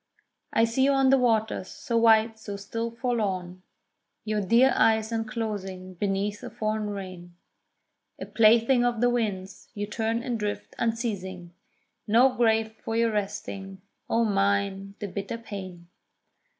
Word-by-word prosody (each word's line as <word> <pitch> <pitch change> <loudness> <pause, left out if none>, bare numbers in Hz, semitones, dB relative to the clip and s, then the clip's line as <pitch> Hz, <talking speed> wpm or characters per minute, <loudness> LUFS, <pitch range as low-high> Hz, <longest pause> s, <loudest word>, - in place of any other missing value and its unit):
I 225 - +3
see 230 +4 +2
you 280 - +4
on 270 -1 +4
the 270 - +6
waters, 220 -5 +1
so 235 - -5
white, 225 -1 +4
so 205 -2 -6
still 230 +4 -4
forlorn, 205 -7 -2 0.6
Your 215 -1 0
dear 235 +7 +4
eyes 220 0 +3
unclosing 210 -5 -4
beneath 200 +2 -2
a - - -7
foreign 215 -1 -2
rain: 185 -3 -8 0.8
A - - -5
plaything 230 +3 +4
of 240 -2 0
the 245 +1 +3
winds, 200 -5 -3
you 205 0 -2
turn 225 +2 -2
and 245 -4 -2
drift 210 -1 -4
unceasing, 195 -7 -3 0.5
No 245 +5 +5
grave 225 -2 +2
for 225 - -3
your 230 0 +2
resting; 195 -2 -4 0.3
O 230 0 +2
mine 200 -1 0
the 205 - -5
bitter 200 +4 -5
pain! 190 -6 -8
215 Hz, 140 wpm, -26 LUFS, 195-230 Hz, 0.8 s, the